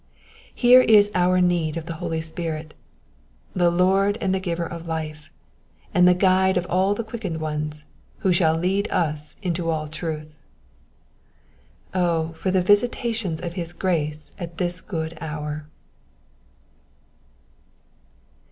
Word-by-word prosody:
Here 250 +1 +7
is 210 -4 +5
our 185 0 +3
need 170 -3 +1
of 165 - -5
the 165 - -5
oly 160 0 -2
Spirit, 160 -1 -5 0.8
the 175 -1 +3
Lord 190 +4 +3
and 190 -2 0
giver 170 -2 -2
of 170 0 -7
life, 155 -2 -5 0.6
and 180 0 +5
the 180 - +6
guide 190 0 +3
of 180 - 0
all 190 +3 +2
the 230 - -3
quickened 215 -7 -5
ones, 150 -1 -4 0.4
who 185 - +5
shall 160 -2 +3
lead 190 +4 0
us 150 -3 -2
into 170 -2 -1
all 155 -1 -1
truth. 155 -1 -5 1.6
O, 170 -3 +1
for 175 +4 -3
the 185 -1 +2
visitations 205 -3 +1
of 170 -1 -4
his 170 -2 -5
grace 155 -4 -2
at 170 -2 -7
this 175 0 -2
good 160 -4 -5
hour 150 -1 -5
170 Hz, 130 wpm, -23 LUFS, 160-185 Hz, 1.6 s, Here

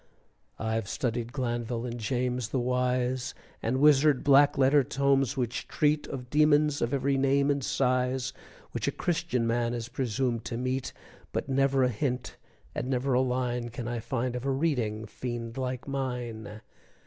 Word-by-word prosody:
I've 110 -1 -2
studied 120 -1 -2
Glanville 120 -3 -2
and 120 0 -5
James 125 0 -1
the 130 - 0
wise. 125 +1 0 0.3
And 125 +3 0
wizard 150 -1 +5
black 140 0 +5
letter 135 +1 +5
tomes 135 +1 +1
which 120 -2 -2
treat 150 0 +1
Of 125 -2 -7
demons 150 -1 +4
of 120 - 0
every 135 0 +1
name 140 +1 +3
and 140 -1 -1
size 130 0 0 0.4
Which - - -3
a - - +2
Christian 170 -8 -1
man 120 +1 0
is 115 0 -5
presumed 125 -1 -1
to 115 - -3
meet, 130 +1 -2 0.4
But - - -3
never 135 0 +3
a 125 - +3
hint 125 +1 -2 0.4
and 125 - -3
never 130 +1 0
a 125 - +4
line 125 -2 -1
Can 120 0 -6
I 120 -1 -2
find 125 +2 -2
of 125 - -4
a 135 - -1
reading 125 -7 0
fiend 115 0 -5
like 130 0 -3
mine. 120 -6 -4
125 Hz, 160 wpm, -29 LUFS, 120-135 Hz, 0.4 s, wizard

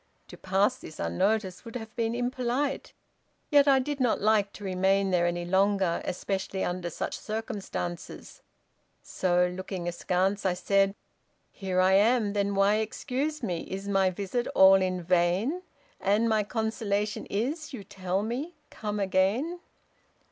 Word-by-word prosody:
To - - -10
pass 195 +6 +1
this 155 - -11
unnoticed 185 - 0
would 230 -1 -10
have 225 -1 -7
been 230 -1 -1
impolite; 250 +3 -1 0.6
yet 290 -1 +6
I 275 -1 +6
did 285 +2 -2
not 250 -3 +2
like 210 -1 +2
to 205 - -11
remain 190 +1 +1
there 175 -1 +3
any 175 0 -2
longer, 190 -1 +2
especially 190 +1 -3
under 180 -1 -2
such - - -4
circumstances: 210 -5 -5 0.6
so, 180 -1 +1
looking 185 -1 -5
askance, 185 +3 0
I 185 -2 +1
said 195 +1 +2 0.6
Here 190 -2 -2
I 185 +1 +4
am, 210 +1 +3
then 200 -1 0
why 200 +2 +4
excuse 270 +6 -3
me, 180 -6 -1
is 195 +1 -5
my 195 -1 +3
visit 200 +6 -3
all 190 0 +7
in 185 -1 -1
vain: 180 - +1 0.4
And 210 +4 +2
my 220 -1 +3
consolation 215 -2 -2
is, 290 +10 -2
you 240 -7 -7
tell 190 0 -2
me, 265 +10 -4 0.2
come 210 -1 -4
again? 200 - +1
200 Hz, 145 wpm, -28 LUFS, 185-230 Hz, 0.6 s, all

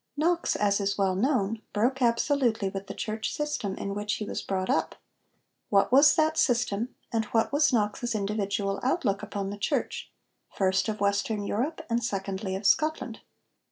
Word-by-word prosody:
Knox, 340 +3 +1
as 200 -1 +2
is 200 0 -1
well 195 -2 +2
known, 220 0 0
broke 250 +5 +1
absolutely 235 -3 +2
with 195 0 -6
the 195 - -6
church 215 +1 -3
system 295 -10 -2
in 200 - -4
which 205 +1 -2
he 210 - -4
was - - -4
brought 190 -1 -2
up. 265 - 0 0.7
What 200 +1 +3
was 280 +2 +7
that 315 0 +2
system, 240 -4 +1 0.2
and 225 -1 +1
what 225 +4 0
was 295 +1 +4
Knox's 225 +1 0
individual 200 -1 -1
outlook 250 - 0
upon 200 -2 -4
the 205 - -7
Church - - -2 0.4
first, 190 +2 +1
of 215 -1 -4
Western 200 +1 0
Europe, 300 +11 -2
and 235 0 0
secondly 195 -2 -3
of 195 +2 -6
Scotland? 310 +10 +1
215 Hz, 165 wpm, -27 LUFS, 200-255 Hz, 0.7 s, was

